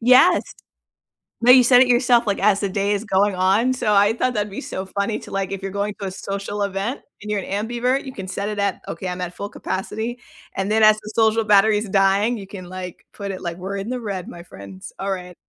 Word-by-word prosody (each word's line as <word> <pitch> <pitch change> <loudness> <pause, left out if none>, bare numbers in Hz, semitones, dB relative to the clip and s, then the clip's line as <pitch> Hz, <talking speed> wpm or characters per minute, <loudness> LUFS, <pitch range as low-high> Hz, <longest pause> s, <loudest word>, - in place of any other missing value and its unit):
Yes. 255 +9 +6 1.0
No, 240 +2 +6
you 255 0 +8
set 245 +1 +6
it 260 - +5
yourself, 240 -1 +3
like, 200 -2 -1
as 200 0 +3
the 200 - -1
day 200 +1 0
is 205 +1 -2
going 200 -1 +1
on, 195 +7 +2
so, 225 -4 0
I 205 +2 +4
thought 250 +2 0
that'd 210 -2 -1
be 195 - -6
so 190 - -5
funny 200 +3 -2
to, - - -12
like, 195 -1 -2
if 195 -1 -4
you're 195 0 -5
going 200 +1 -2
to 200 - -4
a - - -4
social 200 +2 -4
event 200 +6 -3 0.2
and 210 - -8
you're 210 -1 0
an 205 +4 -3
ambivert, 250 +3 0
you 265 - -7
can 195 -4 -7
set 200 +2 -3
it 210 - -4
at, 200 -2 -1
"Okay, 175 +3 -5
I'm 180 0 -5
at 180 -1 -5
full 200 - -5
capacity," 220 +7 -4 0.4
and 195 +1 -2
then 220 +1 +3
as 215 0 +7
the 215 0 -9
social 225 0 +3
battery's 210 0 +3
dying, 195 +4 +2
you 195 -2 -9
can 190 -2 -9
like 185 -1 -8
put 200 -1 -5
it 185 - -7
like, 170 -1 -4
"We're 190 +2 -5
in 195 +3 -5
the 250 0 -3
red, 195 -5 -5
my 170 - -10
friends, 95 - -11
alright." 185 -2 -4
200 Hz, 245 wpm, -21 LUFS, 195-220 Hz, 1.0 s, you